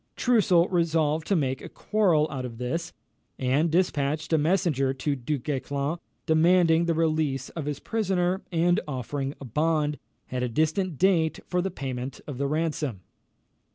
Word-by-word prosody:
Troussel 190 Hz, -8 st, +3 dB
resolved 160 Hz, -3 st, +1 dB
to 200 Hz, -, +2 dB
make 135 Hz, -5 st, 0 dB
a -, -, -8 dB
quarrel 180 Hz, -8 st, +2 dB
out 135 Hz, -3 st, -4 dB
of 120 Hz, -2 st, -6 dB
this, 165 Hz, +8 st, -3 dB, 0.5 s
and 135 Hz, +6 st, +1 dB
despatched 155 Hz, -3 st, 0 dB
a -, -, +5 dB
messenger 150 Hz, -5 st, +1 dB
to 140 Hz, +2 st, -1 dB
Du 140 Hz, +3 st, -2 dB
Guesclin, 140 Hz, +3 st, -2 dB, 0.3 s
demanding 165 Hz, +1 st, +4 dB
the 165 Hz, -1 st, +1 dB
release 155 Hz, -5 st, 0 dB
of 160 Hz, -4 st, -6 dB
his 145 Hz, -1 st, -3 dB
prisoner, 190 Hz, -4 st, 0 dB
and 175 Hz, +1 st, +3 dB
offering 135 Hz, +1 st, -3 dB
a 140 Hz, -, -8 dB
bond, 150 Hz, +3 st, 0 dB, 0.3 s
at 125 Hz, 0 st, -2 dB
a 125 Hz, -, 0 dB
distant 160 Hz, -, 0 dB
date, 170 Hz, -3 st, +2 dB
for 180 Hz, 0 st, 0 dB
the 190 Hz, -, -1 dB
payment 130 Hz, -6 st, -5 dB
of 135 Hz, -4 st, -7 dB
the 140 Hz, -, +1 dB
ransom. 150 Hz, -, -2 dB
155 Hz, 155 wpm, -26 LUFS, 140-170 Hz, 0.5 s, a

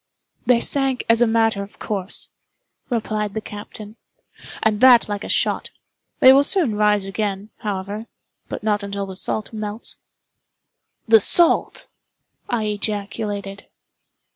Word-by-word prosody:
"They 245 Hz, -2 st, +5 dB
sank 270 Hz, 0 st, -1 dB
as 230 Hz, +1 st, +5 dB
a 240 Hz, -, +5 dB
matter 225 Hz, -2 st, +1 dB
of 200 Hz, +1 st, -10 dB
course," 195 Hz, -2 st, -3 dB, 0.6 s
replied 215 Hz, -3 st, -2 dB
the -, -, -1 dB
captain, 210 Hz, +1 st, -10 dB, 0.7 s
"and 215 Hz, -1 st, +1 dB
that 250 Hz, -3 st, +7 dB
like 205 Hz, -1 st, -4 dB
a -, -, -7 dB
shot. -, -, 0 dB, 0.5 s
They 260 Hz, -, +9 dB
will 275 Hz, +1 st, +5 dB
soon 300 Hz, -, +2 dB
rise 210 Hz, -1 st, +2 dB
again, 200 Hz, +1 st, -4 dB
however—but 205 Hz, +2 st, -7 dB
not 210 Hz, -1 st, +1 dB
till 200 Hz, -1 st, -5 dB
the 190 Hz, -1 st, -9 dB
salt 215 Hz, +3 st, -3 dB
melts." 215 Hz, +1 st, -5 dB, 1.1 s
"The 225 Hz, 0 st, +7 dB
salt!" 340 Hz, -, +4 dB, 0.6 s
I 240 Hz, -3 st, -1 dB
ejaculated. 205 Hz, -1 st, -4 dB
210 Hz, 125 wpm, -21 LUFS, 205-230 Hz, 1.1 s, They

